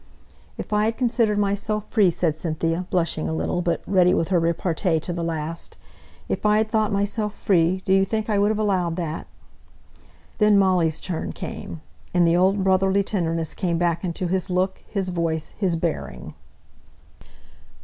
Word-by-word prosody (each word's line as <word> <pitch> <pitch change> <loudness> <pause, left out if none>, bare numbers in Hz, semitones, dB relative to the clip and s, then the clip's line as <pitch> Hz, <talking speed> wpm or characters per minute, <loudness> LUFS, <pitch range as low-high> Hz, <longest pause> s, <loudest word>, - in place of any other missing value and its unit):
"If - - -5
I 210 0 +3
had 225 +1 -1
considered 230 -4 +1
myself 205 +1 -1
free," 205 -5 +4
said 170 -2 0
Cynthia, 165 +2 -2
blushing 165 - -1
a 80 - -2
little, 80 - -1
but 170 -1 -1
ready 180 -2 +4
with 165 - 0
her 180 -3 +3
repartee 165 0 0
to 175 +3 -5
the 170 0 -3
last, 165 0 -4 0.5
"if - - -3
I 210 0 +4
had 215 0 0
thought 215 -2 +1
myself 205 +1 -1
free, 185 0 +2
do 190 - +2
you 195 0 +5
think 215 +2 -2
I 210 -2 +1
would 205 +1 +3
have 215 - 0
allowed 185 -6 0
that?" 165 -3 -4 1.1
Then 210 -1 +5
Molly's 180 -5 +2
turn 175 -3 -4
came, 165 - -7 0.3
and 175 -1 +5
the 165 - +3
old 190 +2 +3
brotherly 190 +1 +3
tenderness 165 -5 -2
came 170 -2 -1
back 170 0 0
into 180 +1 -3
his 185 +1 -1
look, 185 +1 0
his 195 -3 -2
voice, 165 -3 -2
his 185 -5 0
bearing. 160 - -4
185 Hz, 170 wpm, -23 LUFS, 165-200 Hz, 1.1 s, you